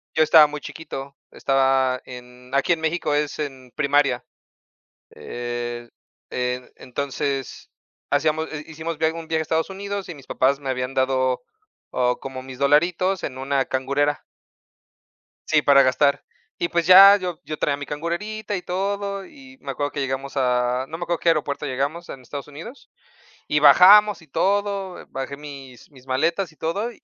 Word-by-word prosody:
yo 155 Hz, -, +5 dB
estaba 155 Hz, -1 st, +7 dB
muy 150 Hz, 0 st, -7 dB
chiquito, 140 Hz, -3 st, -8 dB, 0.2 s
estaba 135 Hz, -1 st, +1 dB
en 125 Hz, 0 st, -12 dB
aquí 140 Hz, +5 st, +3 dB
en 160 Hz, -, -4 dB
México 160 Hz, -2 st, -1 dB
es 150 Hz, 0 st, -2 dB
en 130 Hz, -4 st, -6 dB
primaria, 140 Hz, -3 st, +2 dB, 0.9 s
eh, 120 Hz, 0 st, -6 dB, 0.4 s
e 125 Hz, 0 st, -3 dB
entonces, 135 Hz, 0 st, -4 dB, 0.4 s
hacíamos 155 Hz, +2 st, +1 dB
hi 150 Hz, 0 st, -5 dB
hicimos 160 Hz, 0 st, -5 dB
viaj 160 Hz, 0 st, +1 dB
un 165 Hz, -1 st, -7 dB
viaje 160 Hz, -1 st, 0 dB
a -, -, -2 dB
Estados 160 Hz, +3 st, 0 dB
Unidos 200 Hz, 0 st, -5 dB
y 165 Hz, -, -6 dB
mis 135 Hz, -, -15 dB
papás 135 Hz, +2 st, +1 dB
me 135 Hz, -2 st, -6 dB
habían 125 Hz, +1 st, -2 dB
dado, 130 Hz, -1 st, +1 dB, 0.5 s
oh, 125 Hz, -1 st, 0 dB
como 130 Hz, -1 st, -7 dB
mis 130 Hz, 0 st, -10 dB
dolaritos 175 Hz, +6 st, +2 dB
en 130 Hz, -1 st, -5 dB
una 135 Hz, 0 st, 0 dB
cangurera. 140 Hz, +2 st, -1 dB, 1.2 s
Sí, 155 Hz, -1 st, +3 dB
para 140 Hz, -2 st, +6 dB
gastar, 140 Hz, +2 st, +2 dB, 0.3 s
y, 170 Hz, -, -1 dB
pues, 170 Hz, 0 st, 0 dB
ya, 195 Hz, +2 st, +10 dB
yo 180 Hz, -3 st, -5 dB
yo 155 Hz, -, -6 dB
traía 140 Hz, -1 st, 0 dB
mi 145 Hz, -, -6 dB
cangurerita 200 Hz, +8 st, -4 dB
y 180 Hz, -, -5 dB
todo, 200 Hz, +1 st, -3 dB
y 270 Hz, -2 st, -16 dB
me -, -, -5 dB
acuerdo 145 Hz, 0 st, -3 dB
que 145 Hz, -, -5 dB
llegamos 135 Hz, 0 st, -3 dB
a 125 Hz, 0 st, +1 dB
no 160 Hz, -, -5 dB
me 175 Hz, -, -4 dB
acuerdo 175 Hz, -1 st, -2 dB
qué 170 Hz, -, +2 dB
aeropuerto 150 Hz, -2 st, 0 dB
llegamos 140 Hz, +6 st, -3 dB
en 130 Hz, -, -8 dB
Estados 140 Hz, +3 st, -8 dB
Unidos, 165 Hz, -, -11 dB, 0.6 s
y 150 Hz, -, +1 dB
bajamos 195 Hz, +6 st, +7 dB
y -, -, -17 dB
todo, 200 Hz, +3 st, -1 dB
bajé 135 Hz, +1 st, -5 dB
mis 135 Hz, -4 st, -11 dB
mis 130 Hz, -1 st, -18 dB
maletas 165 Hz, +7 st, 0 dB
y 155 Hz, -, -23 dB
todo, 200 Hz, +10 st, -2 dB
145 Hz, 165 wpm, -23 LUFS, 130-170 Hz, 1.2 s, ya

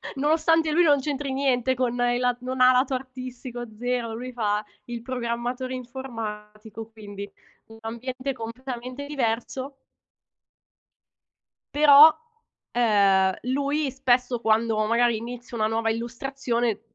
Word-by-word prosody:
nonostante 315 Hz, +2 st, +2 dB
lui 345 Hz, +3 st, +4 dB
non 290 Hz, -3 st, +5 dB
c'entri 275 Hz, -1 st, -3 dB
niente 260 Hz, -2 st, +1 dB
con 245 Hz, -1 st, 0 dB
il 245 Hz, 0 st, +2 dB
la 250 Hz, -1 st, +1 dB
non 255 Hz, +1 st, -4 dB
ha 255 Hz, 0 st, +8 dB
lato 260 Hz, +2 st, +2 dB
artistico 255 Hz, -1 st, -6 dB
zero, 245 Hz, -2 st, -2 dB
lui 250 Hz, +3 st, -6 dB
fa 210 Hz, -2 st, 0 dB, 0.2 s
il 240 Hz, -1 st, -6 dB
programmatore 245 Hz, +1 st, -3 dB
informatico, 225 Hz, -4 st, -7 dB
quindi 205 Hz, -2 st, -9 dB, 0.4 s
un 225 Hz, 0 st, -14 dB
ambiente 255 Hz, +4 st, -4 dB
completamente 255 Hz, +3 st, -6 dB
diverso 260 Hz, 0 st, -2 dB, 2.0 s
però, 295 Hz, +1 st, +8 dB, 0.6 s
ehm, 200 Hz, -5 st, +3 dB, 0.2 s
lui 285 Hz, +1 st, 0 dB
spesso 250 Hz, -2 st, +1 dB
quando 225 Hz, 0 st, +2 dB
magari 235 Hz, 0 st, +2 dB
inizio 240 Hz, +1 st, -7 dB
una 215 Hz, 0 st, +2 dB
nuova 225 Hz, 0 st, 0 dB
illustrazione, 235 Hz, -1 st, -2 dB
245 Hz, 115 wpm, -25 LUFS, 225-265 Hz, 2.0 s, ha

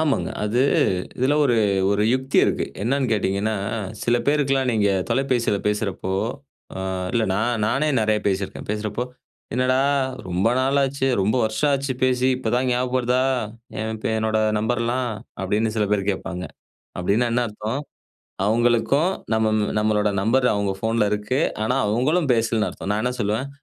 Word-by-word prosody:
ஆமாங்க. 155 Hz, -3 st, 0 dB
அது 115 Hz, +5 st, +1 dB, 0.6 s
இதுல 130 Hz, +4 st, +2 dB
ஒரு, 120 Hz, -4 st, +2 dB, 0.3 s
ஒரு 100 Hz, +1 st, +2 dB
யுக்தி 130 Hz, +1 st, 0 dB
இருக்கு. -, -, 0 dB, 0.2 s
என்னன்னு 130 Hz, +2 st, 0 dB
கேட்டீங்கன்னா, 105 Hz, +1 st, 0 dB, 0.5 s
சில 120 Hz, 0 st, +2 dB
பேருக்கெல்லாம் 135 Hz, -3 st, +2 dB
நீங்க 105 Hz, -2 st, +2 dB, 0.2 s
தொலைபேசியில 125 Hz, -6 st, +1 dB
பேசுறப்போ, 100 Hz, -3 st, -2 dB, 0.6 s
அ -, -, -4 dB, 0.3 s
இல்ல 115 Hz, -2 st, +2 dB
நா -, -, 0 dB, 0.3 s
நானே 135 Hz, +7 st, +1 dB
நெறையா 105 Hz, -1 st, +1 dB
பேசிருக்கேன். 95 Hz, 0 st, -2 dB
பேசுறப்போ, 105 Hz, +2 st, -2 dB, 0.5 s
"என்னடா 130 Hz, +1 st, +2 dB, 0.5 s
ரொம்ப 90 Hz, +5 st, +1 dB
நாள் 135 Hz, +2 st, +2 dB
ஆச்சு, 135 Hz, 0 st, -1 dB, 0.2 s
ரொம்ப 105 Hz, +6 st, +1 dB
வருஷம் 110 Hz, +7 st, +1 dB
ஆச்சு 135 Hz, 0 st, -1 dB
பேசி 130 Hz, 0 st, +2 dB
இப்ப 125 Hz, -3 st, -3 dB
தான் 130 Hz, +1 st, +1 dB
ஞாபகம் 125 Hz, +1 st, 0 dB
வருதா? 125 Hz, +1 st, +1 dB, 0.6 s
என் 110 Hz, 0 st, -4 dB
பே -, -, +1 dB
என்னோட 110 Hz, 0 st, 0 dB, 0.2 s
நம்பர்லாம்." 120 Hz, +3 st, 0 dB, 0.3 s
அப்டின்னு 105 Hz, +3 st, 0 dB
சில 105 Hz, -1 st, +2 dB
பேர் 100 Hz, -1 st, 0 dB
கேட்பாங்க. 90 Hz, -1 st, -5 dB, 0.6 s
அப்டின்னா, 100 Hz, +7 st, +1 dB
என்ன 120 Hz, +1 st, +2 dB
அர்த்தம்? 110 Hz, +6 st, -4 dB, 0.7 s
அவங்களுக்கும் 120 Hz, -, +2 dB, 0.2 s
நம் 110 Hz, 0 st, +2 dB, 0.3 s
நம்மளோட 105 Hz, -1 st, +2 dB
நம்பர் 125 Hz, +5 st, +2 dB
அவங்க 100 Hz, -1 st, 0 dB
ஃபோன்ல 110 Hz, -1 st, +1 dB
இருக்கு. 105 Hz, +6 st, -1 dB, 0.2 s
ஆனா, 125 Hz, +4 st, +1 dB
அவங்களும் 135 Hz, +9 st, +1 dB
பேசலன்னு 115 Hz, -1 st, +1 dB
அர்த்தம். 95 Hz, -, -6 dB
நான் 105 Hz, +1 st, -1 dB
என்ன 125 Hz, +1 st, 0 dB
சொல்லுவேன், 110 Hz, +7 st, -1 dB
115 Hz, 145 wpm, -23 LUFS, 105-130 Hz, 0.7 s, இதுல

